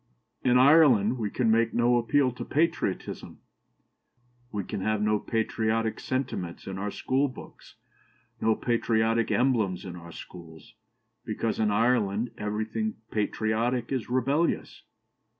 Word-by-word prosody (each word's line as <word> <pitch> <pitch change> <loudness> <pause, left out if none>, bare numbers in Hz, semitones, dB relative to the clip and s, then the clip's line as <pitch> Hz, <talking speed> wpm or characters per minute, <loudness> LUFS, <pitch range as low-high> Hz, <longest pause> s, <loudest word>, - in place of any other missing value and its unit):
'In 125 -1 +4
Ireland 130 -5 +5
we 105 -2 -1
can 115 +1 +1
make 115 0 +2
no 120 +1 +3
appeal 130 +3 +2
to 125 - -7
patriotism, 160 - -2 1.1
we 105 -2 -3
can 95 - -5
have 110 +1 0
no 105 0 +1
patriotic 110 0 -1
sentiments 125 -10 -4
in 95 0 -5
our 100 +1 -2
schoolbooks, 130 +5 -3 0.7
no 110 0 +3
patriotic 115 -1 +1
emblems 110 -9 +1
in 90 -2 -7
our 85 -1 -10
schools, 85 +5 -12 0.5
because 110 -1 -2
in 110 -1 +2
Ireland 110 0 +1
everything 110 +1 -2 0.2
patriotic 110 +3 -1
is 130 -4 -2
rebellious.' 135 +6 0
115 Hz, 120 wpm, -27 LUFS, 105-125 Hz, 1.1 s, Ireland